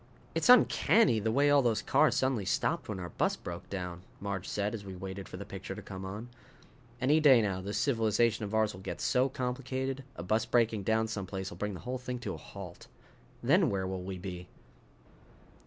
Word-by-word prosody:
"It's 165 Hz, +8 st, 0 dB
uncanny 225 Hz, -, +6 dB
the 110 Hz, +1 st, 0 dB
way 140 Hz, +4 st, +4 dB
all 145 Hz, -1 st, +6 dB
those 115 Hz, -4 st, +1 dB
cars -, -, +3 dB
suddenly 130 Hz, -5 st, +1 dB
stopped 95 Hz, -, 0 dB
when 100 Hz, -3 st, -3 dB
our 90 Hz, -1 st, -5 dB
bus -, -, 0 dB
broke 85 Hz, 0 st, -8 dB
down," 90 Hz, -2 st, -5 dB, 0.2 s
Marge 100 Hz, -2 st, -4 dB
said 105 Hz, +1 st, -1 dB
as 110 Hz, -3 st, -5 dB
we 95 Hz, -1 st, -8 dB
waited 95 Hz, +1 st, -7 dB
for -, -, -7 dB
the -, -, -7 dB
picture -, -, -7 dB
to -, -, -7 dB
come 95 Hz, -1 st, -7 dB
on. 105 Hz, +5 st, -6 dB, 0.7 s
"Any 145 Hz, +5 st, +4 dB
day 140 Hz, -5 st, +7 dB
now 100 Hz, -4 st, -1 dB
this 100 Hz, +2 st, -3 dB
civilization 115 Hz, -3 st, +2 dB
of 105 Hz, +1 st, -3 dB
ours 110 Hz, -1 st, +2 dB
will 95 Hz, -, -10 dB
get -, -, -5 dB
so 130 Hz, +2 st, +2 dB
complicated 130 Hz, +1 st, -3 dB
a -, -, -6 dB
bus 110 Hz, +5 st, +1 dB
breaking 115 Hz, -3 st, +2 dB
down 110 Hz, +2 st, +1 dB
someplace 95 Hz, -3 st, -4 dB
will 85 Hz, -, -9 dB
bring 105 Hz, +1 st, -3 dB
the -, -, -9 dB
whole 125 Hz, +1 st, -4 dB
thing 125 Hz, 0 st, -4 dB
to -, -, -3 dB
a -, -, -6 dB
halt. 95 Hz, -3 st, -10 dB, 0.6 s
Then -, -, +4 dB
where 95 Hz, -2 st, -1 dB
will 95 Hz, 0 st, -3 dB
we 95 Hz, +1 st, -5 dB
be?" 90 Hz, -1 st, -7 dB
105 Hz, 205 wpm, -31 LUFS, 95-125 Hz, 0.7 s, day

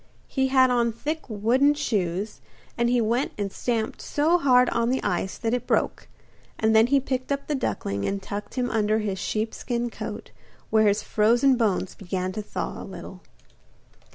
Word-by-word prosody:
He 265 Hz, -1 st, 0 dB
had 260 Hz, -1 st, +4 dB
on 235 Hz, -1 st, +2 dB
thick 300 Hz, +8 st, -3 dB
wooden 245 Hz, +7 st, +3 dB
shoes, 205 Hz, -, -2 dB, 0.3 s
and 235 Hz, 0 st, +1 dB
he 245 Hz, 0 st, +3 dB
went 235 Hz, +4 st, 0 dB
and 200 Hz, -2 st, -2 dB
stamped 225 Hz, +1 st, -2 dB
so 320 Hz, +4 st, +2 dB
hard 250 Hz, -4 st, +5 dB
on 235 Hz, 0 st, +1 dB
the 260 Hz, +1 st, 0 dB
ice 190 Hz, -1 st, -1 dB
that 225 Hz, 0 st, -1 dB
it 250 Hz, -, -2 dB
broke, -, -, 0 dB, 0.5 s
and 220 Hz, 0 st, +2 dB
then 220 Hz, +1 st, +6 dB
he 280 Hz, +2 st, +4 dB
picked 260 Hz, 0 st, -3 dB
up 280 Hz, 0 st, -1 dB
the 300 Hz, -, -2 dB
duckling 100 Hz, -, -2 dB
and 200 Hz, 0 st, -1 dB
tucked 205 Hz, +1 st, -6 dB
him 250 Hz, -1 st, -1 dB
under 215 Hz, -1 st, +2 dB
his 205 Hz, -3 st, -2 dB
sheepskin 235 Hz, +4 st, -2 dB
coat, -, -, -7 dB, 0.4 s
where 220 Hz, -1 st, +5 dB
his 205 Hz, +1 st, +2 dB
frozen 240 Hz, +5 st, +3 dB
bones 205 Hz, -6 st, 0 dB
began 185 Hz, -1 st, -3 dB
to 215 Hz, +3 st, -4 dB
thaw 205 Hz, -, -5 dB
a -, -, -7 dB
little. -, -, -9 dB
230 Hz, 180 wpm, -25 LUFS, 210-255 Hz, 0.5 s, then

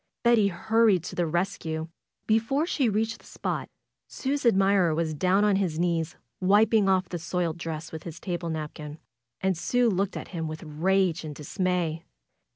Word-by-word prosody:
Betty 235 Hz, -4 st, +5 dB
hurried 205 Hz, 0 st, +2 dB
to -, -, -6 dB
the 175 Hz, -1 st, 0 dB
rescue. 165 Hz, -2 st, -2 dB, 0.4 s
Before 225 Hz, +8 st, +2 dB
she 275 Hz, -8 st, +1 dB
reached 220 Hz, +2 st, -1 dB
the -, -, -20 dB
spot, -, -, -4 dB, 0.4 s
Sue's 275 Hz, -1 st, -1 dB
admirer 195 Hz, -5 st, +4 dB
was 160 Hz, -1 st, -1 dB
down 185 Hz, +6 st, +2 dB
on 205 Hz, -2 st, +3 dB
his 180 Hz, -6 st, -1 dB
knees 170 Hz, -1 st, 0 dB, 0.2 s
wiping 205 Hz, +2 st, +4 dB
off 185 Hz, -1 st, +2 dB
the 175 Hz, -, -4 dB
soiled 170 Hz, +1 st, -2 dB
dress 160 Hz, -1 st, -5 dB
with 160 Hz, -, -6 dB
his 170 Hz, -1 st, -8 dB
table 175 Hz, -2 st, -3 dB
napkin. 150 Hz, -1 st, -5 dB, 0.4 s
And 190 Hz, -1 st, +1 dB
Sue 240 Hz, +7 st, +2 dB
looked 195 Hz, +1 st, -1 dB
at -, -, -7 dB
him 165 Hz, -3 st, -4 dB
with 155 Hz, 0 st, -6 dB
rage 175 Hz, +3 st, +1 dB
and 150 Hz, -2 st, -6 dB
dismay. 170 Hz, +1 st, -1 dB
180 Hz, 165 wpm, -27 LUFS, 160-205 Hz, 0.4 s, Betty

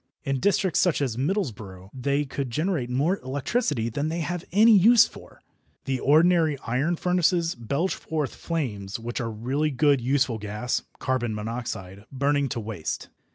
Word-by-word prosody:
In 135 Hz, -2 st, -1 dB
districts 190 Hz, +2 st, +2 dB
such 180 Hz, -4 st, +2 dB
as 130 Hz, -6 st, -1 dB
Middlesbrough 110 Hz, -, -3 dB
they 140 Hz, +3 st, 0 dB
could 135 Hz, -1 st, -4 dB
generate 155 Hz, -1 st, -1 dB
more 145 Hz, +10 st, +1 dB
electricity 135 Hz, -, -1 dB
than 145 Hz, +7 st, -2 dB
they 165 Hz, +1 st, -2 dB
have 175 Hz, +2 st, -3 dB
any 215 Hz, +4 st, +6 dB
use 220 Hz, +4 st, +7 dB
for. -, -, -15 dB, 0.4 s
The 135 Hz, -1 st, -1 dB
ordinary 160 Hz, +1 st, +4 dB
iron 140 Hz, +9 st, 0 dB
furnaces 175 Hz, -1 st, +1 dB
belch 140 Hz, -, -1 dB
forth 155 Hz, -4 st, -3 dB
flames 110 Hz, -, -3 dB
which 120 Hz, +2 st, -4 dB
are 115 Hz, -, -2 dB
really 130 Hz, +8 st, -1 dB
good 140 Hz, -1 st, +3 dB
useful 130 Hz, -2 st, +1 dB
gas 105 Hz, +4 st, -2 dB, 0.2 s
(carbon 120 Hz, -4 st, -1 dB
monoxide) 105 Hz, -3 st, -5 dB
burning 140 Hz, +1 st, +1 dB
to 120 Hz, -, -3 dB
waste. 105 Hz, -7 st, -5 dB
140 Hz, 155 wpm, -25 LUFS, 115-165 Hz, 0.4 s, use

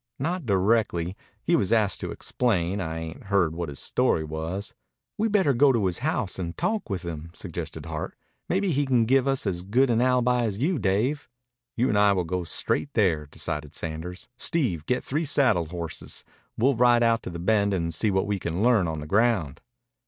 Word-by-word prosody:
"Not 165 Hz, +1 st, -2 dB
directly. 95 Hz, -3 st, +1 dB, 0.3 s
He -, -, +3 dB
was 95 Hz, -, +1 dB
asked 110 Hz, -4 st, +2 dB
to -, -, -4 dB
explain. 100 Hz, -5 st, 0 dB
I 80 Hz, -2 st, -3 dB
ain't 80 Hz, +2 st, -7 dB
heard 95 Hz, -5 st, +2 dB
what 85 Hz, -1 st, -4 dB
his 70 Hz, -, -8 dB
story 80 Hz, -, +1 dB
was." 80 Hz, +6 st, -4 dB, 0.4 s
"We'd 220 Hz, 0 st, 0 dB
better 190 Hz, -9 st, +3 dB
go 135 Hz, +3 st, +5 dB
to 115 Hz, -6 st, +1 dB
his 90 Hz, -2 st, -1 dB
house 125 Hz, -, -1 dB
and 85 Hz, -2 st, -4 dB
talk 220 Hz, -, -1 dB
with 95 Hz, -3 st, -3 dB
him," 80 Hz, -1 st, -6 dB
suggested 90 Hz, -5 st, -6 dB
Hart. -, -, -5 dB, 0.3 s
"Maybe 190 Hz, 0 st, +1 dB
he 145 Hz, -1 st, +1 dB
can 125 Hz, -3 st, +3 dB
give 135 Hz, +2 st, +3 dB
as 100 Hz, -10 st, 0 dB
good 120 Hz, +8 st, +2 dB
an 115 Hz, 0 st, +2 dB
alibi 125 Hz, -1 st, +2 dB
as 100 Hz, -3 st, -2 dB
you, 155 Hz, -, 0 dB
Dave." 115 Hz, +11 st, 0 dB, 0.5 s
"You 125 Hz, +3 st, +2 dB
and 105 Hz, -5 st, +2 dB
I 105 Hz, -1 st, +5 dB
will 90 Hz, -2 st, 0 dB
go 90 Hz, +2 st, -2 dB
straight 115 Hz, -, -1 dB
there," 85 Hz, -9 st, +2 dB
decided 75 Hz, 0 st, -4 dB
Sanders. 85 Hz, +3 st, -5 dB
"Steve, 110 Hz, -, 0 dB
get 125 Hz, -, 0 dB
three 150 Hz, +5 st, -1 dB
saddle 130 Hz, -, +3 dB
horses. 85 Hz, -1 st, -6 dB, 0.3 s
We'll 130 Hz, +5 st, +3 dB
ride 120 Hz, 0 st, +4 dB
out 115 Hz, 0 st, +3 dB
to -, -, -6 dB
the 85 Hz, -, -6 dB
Bend 100 Hz, +3 st, +2 dB
and 85 Hz, -3 st, -1 dB
see 105 Hz, +7 st, +1 dB
what 95 Hz, -1 st, +1 dB
we 100 Hz, -1 st, -1 dB
can 85 Hz, +3 st, -2 dB
learn 115 Hz, -7 st, +4 dB
on 80 Hz, -1 st, -3 dB
the -, -, -6 dB
ground." 100 Hz, -, +1 dB
100 Hz, 195 wpm, -26 LUFS, 85-125 Hz, 0.5 s, go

